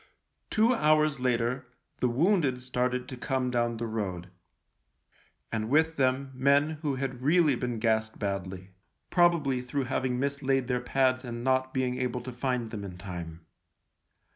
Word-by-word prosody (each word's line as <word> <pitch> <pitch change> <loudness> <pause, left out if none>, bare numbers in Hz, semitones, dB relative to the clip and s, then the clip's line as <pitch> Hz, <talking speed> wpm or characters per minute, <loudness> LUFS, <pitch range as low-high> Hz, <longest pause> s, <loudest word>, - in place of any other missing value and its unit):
Two 225 +3 +3
hours 155 - +3
later 125 +1 0 0.3
the 125 - +2
wounded 145 - +2
started 125 0 -1
to 130 - -6
come 130 0 -1
down 120 -1 0
the 115 - -3
road, 95 -5 -4 1.2
and 110 -1 -2
with 160 +3 +3
them 135 0 +1
men 140 +4 +3
who 145 -4 -1
had 130 -1 -4
really 155 +1 +4
been 120 -1 -2
gassed 110 -1 0
badly 95 -2 -4 0.2
— - - -50
probably 170 -8 +3
through 135 +2 -2
having 130 -1 -1
mislaid 135 -1 0
their 125 0 -1
pads 130 0 +1
and 120 -1 -5
not 130 0 +1
being 130 -1 -1
able 125 -1 -1
to 130 +2 -7
find 125 -2 -2
them 105 -3 -5
in 90 -3 -7
time. 85 -3 -7
125 Hz, 155 wpm, -29 LUFS, 115-135 Hz, 1.2 s, really